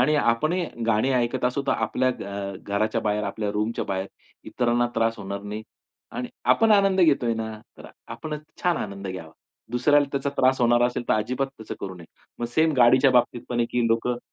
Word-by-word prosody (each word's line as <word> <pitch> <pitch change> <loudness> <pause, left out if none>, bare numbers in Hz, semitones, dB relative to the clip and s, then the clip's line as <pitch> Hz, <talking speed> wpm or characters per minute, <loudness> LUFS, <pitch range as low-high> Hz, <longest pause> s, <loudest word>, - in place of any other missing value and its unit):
आणि 155 - +3
आपणही 155 +8 +1 0.2
गाणी 115 +4 +2
ऐकत 125 +1 0
असू 125 +3 0
तर - - +3
आपल्या 125 +3 0
घ - - -7
अ, 100 0 -5
घराच्या 105 +2 0
बाहेर, 105 0 0
आपल्या 105 +1 -3
रूमच्या 105 +2 -1
बाहेर 95 0 -2 0.4
इतरांना 120 0 +1
त्रास 115 0 +1
होणार 100 0 -5
नाही. 105 +1 -6 0.5
आणि 125 - -4 0.2
आपण 225 -1 +3
आनंद 195 -2 +4
घेतोय 135 -9 +3
ना, 110 0 -4 0.3
तर - - -11 0.2
आपण 155 -1 -5 0.3
छान 175 -2 +2
आनंद 100 -4 -5
घ्यावा. 85 -4 -7 0.4
दुसऱ्याला 145 +4 +4
त्याचा 140 0 -1
त्रास 130 0 +3
होणार 120 0 +4
असेल. 125 0 -3
तर - - +4
अजिबात 125 +5 -1
तसं 110 - -6
करू 95 -1 -5
नये. 85 -2 -12 0.3
मग 120 - -2
सेम 160 0 +4
गाडीच्याबाबतीत 125 -1 +4
पण 120 - -1
आहे, 115 - +2
की 120 -1 +1
लोकं 115 +2 0
120 Hz, 190 wpm, -25 LUFS, 105-130 Hz, 0.5 s, आनंद